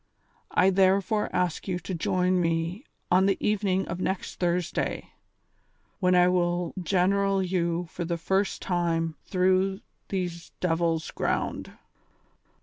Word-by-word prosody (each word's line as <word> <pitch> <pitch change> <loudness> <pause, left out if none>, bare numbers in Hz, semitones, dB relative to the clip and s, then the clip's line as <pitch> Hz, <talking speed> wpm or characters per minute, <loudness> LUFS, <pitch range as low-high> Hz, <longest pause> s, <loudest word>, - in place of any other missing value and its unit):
" - - -37
I 190 - +4
therefore 195 +2 +2
ask 180 0 -1
you 185 -2 -1
to 180 +2 -6
join 180 +2 +1
me 165 - -1 0.3
on 185 +2 +5
the 195 - +2
evening 195 -2 0
of 175 +2 -4
next 190 0 -3
Thursday, 175 -1 -1 0.9
when 180 -1 +3
I 180 0 +6
will 175 -1 0
general 195 +2 +2
you 175 -1 -1
for 170 - -5
the 170 0 -2
first 190 +4 0
time 165 -2 0
through 185 +1 +1 0.3
these 175 -3 -3
devils' 165 -2 0
ground." - - -2
180 Hz, 130 wpm, -27 LUFS, 170-190 Hz, 0.9 s, I